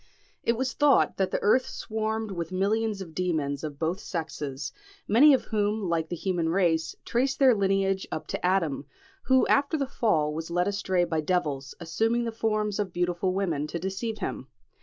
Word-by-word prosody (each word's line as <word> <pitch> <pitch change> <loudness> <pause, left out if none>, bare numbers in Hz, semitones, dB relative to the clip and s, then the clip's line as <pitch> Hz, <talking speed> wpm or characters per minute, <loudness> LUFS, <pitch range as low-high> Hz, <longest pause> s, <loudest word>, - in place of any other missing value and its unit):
It 230 - +1
was 260 +1 -1
thought 290 -3 +3
that 190 -1 +1
the - - -1
earth 255 +5 +4
swarmed 220 -1 -3
with 170 -2 -4
millions 205 +2 0
of 170 -4 -8
demons 155 -6 -1
of 150 -2 -5
both 165 +5 -1
sexes, 145 -7 -4 0.4
many 270 +8 +7
of 265 - +3
whom, 210 -1 0
like 165 -1 -1
the 175 - -2
human 175 -2 -1
race, 165 -3 +1
traced 265 +3 0
their 265 -3 +6
lineage 195 -1 +1
up 155 - -4
to - - -4
Adam, 165 -7 +1 0.4
who 260 -1 +4
after 285 +3 +2
the 280 - 0
fall 185 - +1
was 160 +2 -5
led 175 +2 +1
astray 190 -3 +1
by 165 -2 -1
devils, 150 -5 -1
assuming 225 +8 0
the 230 - -2
forms 215 -2 -1
of 200 -3 -1
beautiful 175 +1 0
women 165 -7 -1
to 170 - -4
deceive 195 +5 -3
him. 130 - -4
190 Hz, 180 wpm, -27 LUFS, 165-220 Hz, 0.4 s, many